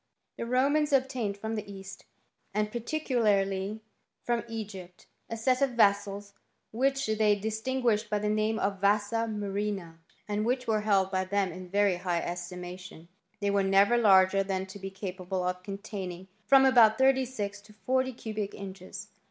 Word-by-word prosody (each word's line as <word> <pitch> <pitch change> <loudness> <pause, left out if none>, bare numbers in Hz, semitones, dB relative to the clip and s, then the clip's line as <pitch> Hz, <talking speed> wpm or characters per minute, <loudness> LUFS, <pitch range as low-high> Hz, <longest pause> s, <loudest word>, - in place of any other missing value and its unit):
The 230 - -5
Romans 285 +5 +2
obtained 255 -7 0
from 220 +2 -4
the 210 -2 -5
east, 195 0 -10 0.5
and 210 0 0
particu* 245 +2 -2
larly 195 0 +1 0.4
from 240 -2 0
Egypt, 195 -5 -8 0.2
a 230 - -4
set 255 +3 +1
of 275 -3 +2
vessels 200 -2 +2 0.4
which 270 +4 +1
they 215 -1 +2
distin* 220 +5 -2
guished 220 -2 +2
by 210 - +1
the 210 0 -2
name 215 +1 +1
of 195 -2 -1
vasa 210 +3 +2
murrhina, 200 -5 -3 0.3
and 210 0 -1
which 250 +2 0
were 220 -2 +1
held 195 -3 +2
by 185 -1 0
them 195 -1 0
in 180 +1 -9
very 200 -1 +2
high 175 -1 -1
estimation. 175 0 -7 0.3
They 200 0 +1
were 200 0 +2
never 195 +4 +4
Isu'ger 195 -3 +5
than 190 -1 -1
to 190 +1 -11
be 195 0 -5
capable 185 -1 -4
of 180 0 -2
containinff 190 -2 -7 0.2
frcmi 270 -1 +8
about 225 -4 +6
thirty 265 0 +4
six 205 -5 -5
to 210 - -18
forty 260 +4 0
cubic 215 -4 -5
inches. 190 -1 -9
205 Hz, 165 wpm, -29 LUFS, 195-230 Hz, 0.5 s, frcmi